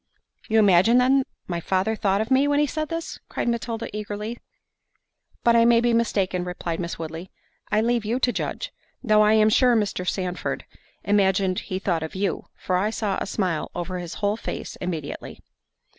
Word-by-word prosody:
"You 220 - +3
imagine, 205 +2 +5
then, 260 +2 +4 0.2
my 175 -2 -3
father 190 +5 0
thought 200 -2 +1
of 220 +4 -4
me, 270 +2 +4
when 290 0 +2
he 295 - +4
said 310 +2 -3
this?" 330 0 -4
cried - - -3
Matilda 235 -1 -2
eagerly. 210 +2 -5 1.0
"But 235 -1 +5
I 230 - +6
may 235 0 +5
be 240 0 +2
mistaken," 195 -6 +1
replied 175 -2 -4
Miss 170 -1 -4
Woodley. 165 +3 -6 0.4
"I 215 0 +3
leave 235 0 +1
you 230 +4 -1
to 245 - +2
judge. - - -4 0.3
Though 215 -3 +4
I 210 0 +5
am 215 0 +5
sure 250 +1 +5
Mr. 200 -4 0
Sandford 180 -2 -3 0.4
imagined 195 -2 +2
he 185 - -4
thought 180 -4 -1
of 160 +2 -6
you, 195 -2 -2
for 185 - 0
I 200 +4 +1
saw 210 -3 -1
a - - -2
smile 185 -6 -1
over 180 +1 -3
his 175 -1 -6
whole 205 +1 0
face - - -5
immediately." 165 -5 -5
210 Hz, 185 wpm, -24 LUFS, 185-235 Hz, 1.0 s, I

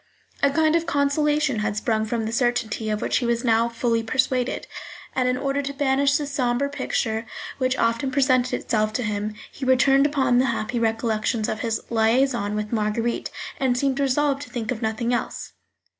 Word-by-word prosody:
A 280 - +5
kind 315 +2 +2
of 335 0 0
consolation 295 -3 +1
had 210 0 -1
sprung 220 0 0
from 225 0 -2
the 220 - -3
certainty 235 -2 0
of 210 0 -1
which - - +1
he 250 - -1
was 235 0 0
now 230 -1 +3
fully 230 0 0
persuaded, 255 +2 0 0.5
and 255 -1 +1
in 250 - 0
order 275 +1 -1
to 280 0 -4
banish 275 0 +2
the 295 - -3
sombre 275 -1 0
picture 225 -5 -2 0.3
which 255 0 +1
often 230 +4 +1
presented 255 -2 +2
itself 215 -1 -1
to 250 - -1
him, 210 0 -2 0.2
he - - -9
returned 270 +2 +4
upon 265 -4 +2
the 260 - +3
happy 235 -1 -1
recollections 225 -1 0
of 215 - -3
his 225 -1 -1
liaison 225 -1 +2
with 210 0 -3
Marguerite, 225 +2 -1 0.3
and 255 -2 +1
seemed 275 +1 0
resolved 280 +1 +1
to 290 - -8
think 230 -2 -4
of 230 - -4
nothing 225 +2 -1
else. 240 - -3
245 Hz, 185 wpm, -23 LUFS, 225-275 Hz, 0.5 s, A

